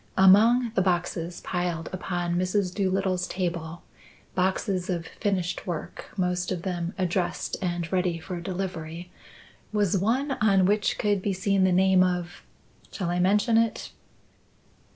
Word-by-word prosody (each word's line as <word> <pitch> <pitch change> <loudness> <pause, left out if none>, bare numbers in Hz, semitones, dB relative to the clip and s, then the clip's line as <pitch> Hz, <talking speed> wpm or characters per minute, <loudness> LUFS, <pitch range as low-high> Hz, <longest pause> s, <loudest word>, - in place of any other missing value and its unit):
Among 220 +6 +6
the 190 - +2
boxes 175 -2 -1
piled 175 -2 -2
upon 175 -2 -2
Mrs. 185 +1 0
Doolittle's 190 -2 0
table 170 -2 -4 0.5
boxes 185 0 0
of 170 -3 -2
finished 185 -3 -2
work, 175 0 -5
most 180 -1 0
of 175 -2 -3
them 175 -1 -3
addressed 180 -1 -1
and 175 -2 -2
ready 180 -2 +1
for 175 +1 -6
delivery 175 -2 -5 0.6
was 205 -3 +1
one 240 +9 +1
on 195 -3 +4
which 205 +2 +1
could 205 -2 +1
be 200 +1 -1
seen 190 +1 +2
the 185 - +3
name 185 0 +5
of 180 -1 -2 0.5
shall 175 -4 -3
I 175 - 0
mention 210 +5 +3
it?" 230 -1 -1
185 Hz, 135 wpm, -26 LUFS, 175-195 Hz, 0.6 s, Among